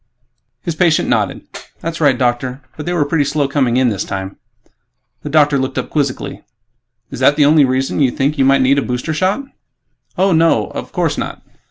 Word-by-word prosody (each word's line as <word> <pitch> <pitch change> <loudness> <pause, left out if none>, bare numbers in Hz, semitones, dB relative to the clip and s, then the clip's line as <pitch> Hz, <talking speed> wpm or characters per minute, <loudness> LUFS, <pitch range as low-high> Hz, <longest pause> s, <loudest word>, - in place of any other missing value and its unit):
His 170 - -2
patient 160 0 +2
nodded, - - 0 0.4
"That's 165 0 -4
right, 140 -4 +4
Doctor. 125 +2 -1
But 150 - -8
they 175 - 0
were 160 -4 +1
pretty 145 +1 +1
slow 145 0 0
coming 130 -4 +1
in 130 -1 +3
this 105 -2 -2
time." 95 -1 -6 0.8
The 150 - -6
doctor 145 -2 +3
looked 130 0 -3
up 130 - -3
quizzically, 140 -1 -2 0.7
"Is - - -7
that 130 +3 +4
the 150 -1 +4
only 150 0 +5
reason 130 +2 -1
you 135 -3 +4
think 140 +3 -1
you - - +4
might 135 0 +4
need 140 +2 +3
a - - 0
booster 125 +5 -3
shot?" 190 - 0 0.7
"Oh, 190 +1 +3
no... 160 - +2
of - - -7
course - - -1
not!" - - -5
140 Hz, 195 wpm, -16 LUFS, 130-155 Hz, 0.8 s, only